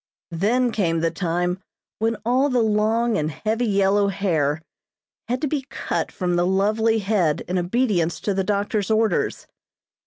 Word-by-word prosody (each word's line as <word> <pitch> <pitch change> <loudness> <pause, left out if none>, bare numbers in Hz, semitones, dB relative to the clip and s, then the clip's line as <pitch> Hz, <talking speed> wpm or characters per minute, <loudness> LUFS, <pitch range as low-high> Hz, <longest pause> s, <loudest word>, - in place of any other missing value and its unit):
Then 230 +9 +1
came 165 -7 0
the 165 0 +1
time 175 +1 -1 0.4
when 225 0 0
all 260 +4 +2
the 250 -3 +2
long 220 +1 +1
and 155 0 -1
heavy 220 +8 -1
yellow 200 0 +3
hair 160 -6 0 0.6
had 250 +2 -2
to 305 - 0
be 280 -2 -3
cut - - -3
from 175 -2 -1
the 175 0 +2
lovely 215 +4 +2
head 195 -7 +1
in 180 +1 -2
obedience 175 -4 0
to 205 - -1
the 195 0 0
doctor's 205 +1 -1
orders. 220 0 +1
205 Hz, 155 wpm, -23 LUFS, 175-225 Hz, 0.6 s, yellow